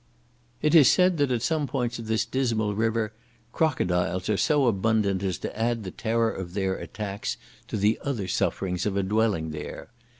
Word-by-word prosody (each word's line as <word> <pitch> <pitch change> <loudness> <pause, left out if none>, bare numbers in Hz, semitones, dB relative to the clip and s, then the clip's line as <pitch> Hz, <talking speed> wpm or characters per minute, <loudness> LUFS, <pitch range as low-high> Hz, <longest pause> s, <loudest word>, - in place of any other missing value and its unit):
It 150 - +3
is 155 -6 +8
said 180 -1 +4
that 145 -2 +3
at 120 -2 0
some 150 +3 0
points 125 -4 -2
of 115 - -7
this 110 0 +1
dismal 115 -5 0
river, 110 0 0 0.4
crocodiles 90 - 0
are 105 - +3
so 150 +1 +3
abundant 105 -3 +1
as 95 -4 -1
to - - -6
add 115 +1 0
the 95 - -6
terror 115 +2 0
of 90 -1 -7
their 95 -2 0
attacks 100 -2 -5 0.3
to - - -3
the 105 +2 +2
other 120 -10 -2
sufferings 90 +1 -1
of 100 -1 -1
a 100 - +1
dwelling 100 -5 +1
there. 75 +7 -7
110 Hz, 180 wpm, -26 LUFS, 95-120 Hz, 0.4 s, is